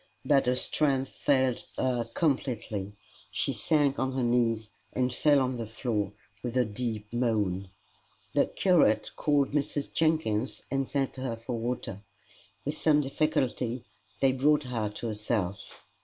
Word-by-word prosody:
But 140 -4 +4
her 125 - +3
strength 135 0 +1
failed 130 -3 +1
her 125 -2 +1
completely; 115 - -1 0.4
she - - -1
sank 145 -3 +2
on 130 0 0
her 130 -1 0
knees 115 -2 +1 0.2
and 125 -1 +1
fell 145 +2 +4
on 130 -1 0
the 115 -2 -4
floor 110 -3 -2 0.3
with 125 0 -3
a 125 - +4
deep 110 0 -4
moan. 105 -6 0 0.6
The - - +3
curate 150 - +3
called 145 -2 +2
Mrs. 145 0 -1
Jenkins 155 -8 +1
and 135 -1 0
sent 135 -2 -1
her 130 -3 -2
for 115 +2 -5
water. 115 -4 -3 0.6
With 145 +2 -1
some 150 -2 +4
difficulty 130 -4 0 0.4
they 135 - +5
brought 150 +3 +3
her 115 -5 -2
to 105 +3 -5
herself. 105 -3 -3
125 Hz, 140 wpm, -29 LUFS, 110-140 Hz, 0.6 s, they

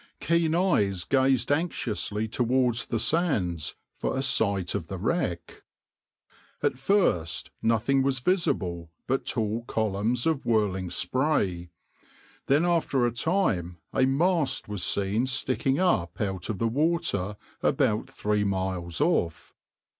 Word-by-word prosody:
Keen 170 -1 +1
eyes 105 - +2
gazed 130 0 +2
anxiously 110 -9 -1
towards 120 +1 +1
the 115 - -1
sands 105 - 0 0.2
for - - -1
a 135 - 0
sight 100 -8 +1
of 90 -6 -3
the 95 - -5
wreck. 90 - -2 1.0
At 125 - 0
first 135 - +1
nothing 115 +4 +2
was 135 0 +1
visible 95 - 0 0.2
but 135 +1 -1
tall 115 -1 -1
columns 110 +2 -1
of 160 -4 +1
whirling 100 -5 0
spray, 95 - 0 0.8
then 145 +5 +3
after 165 -7 +2
a 120 - +1
time 115 - 0 0.2
a 130 -1 +3
mast 160 +2 +1
was 105 -4 -3
seen 100 +8 0
sticking 130 +1 0
up 150 - +1
out 95 -5 -2
of 110 - -2
the 115 - 0
water 135 - 0 0.2
about 105 0 +1
three 105 0 0
miles 95 -4 -2
off. 85 -2 0
115 Hz, 125 wpm, -27 LUFS, 95-135 Hz, 1.0 s, then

